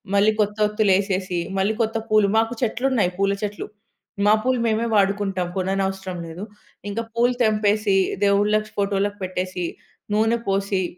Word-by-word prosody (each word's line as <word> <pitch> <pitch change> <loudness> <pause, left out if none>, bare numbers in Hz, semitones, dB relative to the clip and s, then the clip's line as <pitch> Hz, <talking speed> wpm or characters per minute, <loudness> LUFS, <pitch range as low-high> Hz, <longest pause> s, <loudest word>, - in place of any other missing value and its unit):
మళ్ళీ 205 +2 +5
కొత్త 210 0 -1
వత్తులు 210 -1 +1
ఏసేసి. 185 -3 -2 0.2
మళ్ళీ 200 +3 +1
కొత్త 225 0 0
పూలు 215 -1 +4
మాకు 225 +1 +2
చెట్లున్నాయి 240 -4 +1
పూల 200 0 +2
చెట్లు. 205 0 -4 0.6
మా 210 - +6
పూలు 255 -1 +1
మేమే 225 +1 +1
వాడుకుంటాం. 195 -2 +1
కొననవసరం 190 -1 -2
లేదు. 165 +5 -8 0.5
ఇంక 225 - -3
పూలు 240 +2 +2
తెంపేసి, 210 -2 +2 0.3
దేవుళ్ళకి 210 +2 +2
ఫోటోలకి 200 0 0
పెట్టేసి. 185 -1 -3 0.5
నూనె 225 +2 +2
పోసి 195 -1 0
205 Hz, 135 wpm, -22 LUFS, 195-215 Hz, 0.6 s, మా